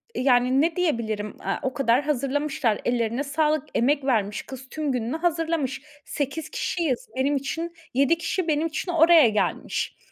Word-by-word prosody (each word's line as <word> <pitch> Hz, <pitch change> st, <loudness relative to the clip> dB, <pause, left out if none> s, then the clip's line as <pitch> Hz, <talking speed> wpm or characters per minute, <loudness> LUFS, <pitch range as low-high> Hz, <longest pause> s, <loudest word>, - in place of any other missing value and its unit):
yani, 255 Hz, 0 st, +3 dB
ne 325 Hz, +1 st, +1 dB
diyebilirim, 225 Hz, -, -1 dB
a, -, -, -2 dB
o 260 Hz, -, -2 dB
kadar 255 Hz, -1 st, +2 dB
hazırlamışlar; 280 Hz, -4 st, 0 dB
ellerine 240 Hz, +2 st, 0 dB
sağlık, 300 Hz, 0 st, +1 dB
emek 275 Hz, +3 st, +2 dB
vermiş 210 Hz, -6 st, 0 dB
kız. 265 Hz, 0 st, -10 dB
Tüm 305 Hz, -1 st, -2 dB
gününü 250 Hz, +3 st, -2 dB
hazırlamış, 325 Hz, -5 st, -1 dB, 0.2 s
8 285 Hz, +2 st, -3 dB
kişiyiz. 350 Hz, -, -2 dB
Benim 275 Hz, +2 st, +1 dB
için, 325 Hz, +5 st, -3 dB, 0.2 s
7 280 Hz, +5 st, +3 dB
kişi 345 Hz, +1 st, -2 dB
benim 310 Hz, +1 st, +1 dB
için 325 Hz, +3 st, -3 dB
oraya 330 Hz, -5 st, +6 dB
gelmiş. 210 Hz, -1 st, -2 dB
280 Hz, 150 wpm, -25 LUFS, 250-320 Hz, 0.2 s, oraya